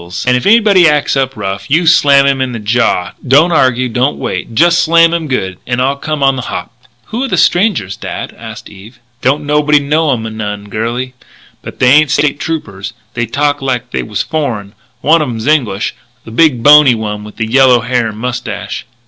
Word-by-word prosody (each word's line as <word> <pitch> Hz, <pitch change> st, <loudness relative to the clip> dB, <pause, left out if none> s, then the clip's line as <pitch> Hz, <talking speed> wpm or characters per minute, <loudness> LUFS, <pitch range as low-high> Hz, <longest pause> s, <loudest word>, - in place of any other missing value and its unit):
And 125 Hz, 0 st, +3 dB
if 125 Hz, -, -1 dB
anybody 205 Hz, -5 st, +5 dB
acts 150 Hz, -1 st, 0 dB
up 135 Hz, -2 st, -1 dB
rough 100 Hz, -1 st, -5 dB
you 165 Hz, +4 st, +2 dB
slam 140 Hz, -4 st, +4 dB
him 135 Hz, -1 st, +1 dB
on 130 Hz, -1 st, -2 dB
the -, -, -4 dB
jaw 105 Hz, -4 st, 0 dB, 0.2 s
don't 150 Hz, +7 st, +4 dB
argue, 130 Hz, -5 st, +2 dB
don't 125 Hz, +4 st, -1 dB
wait 95 Hz, +5 st, -5 dB
just 175 Hz, +7 st, +3 dB
slam 165 Hz, 0 st, +4 dB
him 165 Hz, -2 st, -2 dB
good, 95 Hz, -, -3 dB
and 125 Hz, -1 st, -1 dB
I'll 135 Hz, +2 st, +1 dB
come 150 Hz, 0 st, -4 dB
on 135 Hz, -1 st, +2 dB
the -, -, -3 dB
hop." -, -, -6 dB, 0.4 s
"Who 240 Hz, +4 st, -3 dB
are -, -, -3 dB
the 185 Hz, -7 st, -2 dB
strangers, 175 Hz, -, +1 dB
dad?" -, -, -6 dB
asked -, -, -10 dB
Eve. 105 Hz, +5 st, -14 dB, 0.2 s
"Don't 145 Hz, +3 st, 0 dB
nobody 150 Hz, 0 st, +2 dB
know 150 Hz, +2 st, 0 dB
'em 120 Hz, -4 st, -2 dB
none, 105 Hz, -1 st, -6 dB
girlie. 120 Hz, +5 st, -4 dB, 0.5 s
But -, -, -10 dB
they 125 Hz, 0 st, +3 dB
ain't 150 Hz, +1 st, +5 dB
State 145 Hz, 0 st, 0 dB
Troopers. 105 Hz, -11 st, -5 dB, 0.2 s
They 120 Hz, -1 st, -2 dB
talk 145 Hz, +5 st, -1 dB
like 125 Hz, -2 st, -3 dB
they -, -, -2 dB
was 105 Hz, -2 st, -3 dB
foreign. 115 Hz, -11 st, -4 dB, 0.3 s
One 165 Hz, +2 st, +3 dB
of 150 Hz, -, -2 dB
'em's 115 Hz, -2 st, -5 dB
English 120 Hz, -10 st, 0 dB, 0.3 s
the 115 Hz, -, -10 dB
big, 125 Hz, -2 st, +2 dB
bony 145 Hz, -4 st, +7 dB
one 105 Hz, -1 st, -5 dB
with 105 Hz, +1 st, -13 dB
yellow 125 Hz, +2 st, +3 dB
hair 120 Hz, 0 st, -1 dB
and 105 Hz, -1 st, -7 dB
mustache." 120 Hz, -3 st, -5 dB
130 Hz, 200 wpm, -12 LUFS, 115-150 Hz, 0.5 s, bony